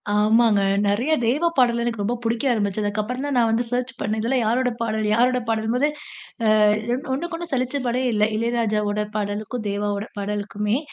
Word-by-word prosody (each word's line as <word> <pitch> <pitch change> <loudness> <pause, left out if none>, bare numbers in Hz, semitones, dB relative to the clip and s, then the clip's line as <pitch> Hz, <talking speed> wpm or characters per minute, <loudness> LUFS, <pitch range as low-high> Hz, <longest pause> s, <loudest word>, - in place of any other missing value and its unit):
ஆமாங்க. 215 0 +4 0.2
நிறைய 215 +9 +1
தேவாப் 305 +9 +1
பாடல் 240 -2 +3
எனக்கு 230 -3 -2
ரொம்ப 235 +4 0
பிடிக்க 230 +3 -1
ஆரம்பிச்சது. 205 -1 -1
அதுக்கு 205 +1 -1
அப்புறம் 250 +6 -4
தான் 285 -2 -1
நான் 230 -2 +3
வந்து 235 +2 +1
சர்ச் 250 0 -1
பண்ணேன். 215 +1 -1
இதிலாம் 245 +2 +1
யாரோடய 245 +2 +1
பாடல்? 220 -1 -1
யாரோட 250 +2 +3
பாடலும்போது, 225 +6 +1 0.8
அ - - +6 0.5
ஒண்ணுக்கு 335 +5 -4
ஒண்ணு 340 0 -7
சலிச்ச 255 +2 -1
பாடே 245 +2 0
இல்ல. 210 -1 +3
இளையராஜாவோட 215 -2 0
பாடலுக்கும், 210 +2 -3
தேவாவோட 205 +1 -2
பாடலுக்குமே! 210 +2 -2
230 Hz, 165 wpm, -23 LUFS, 210-250 Hz, 0.8 s, அ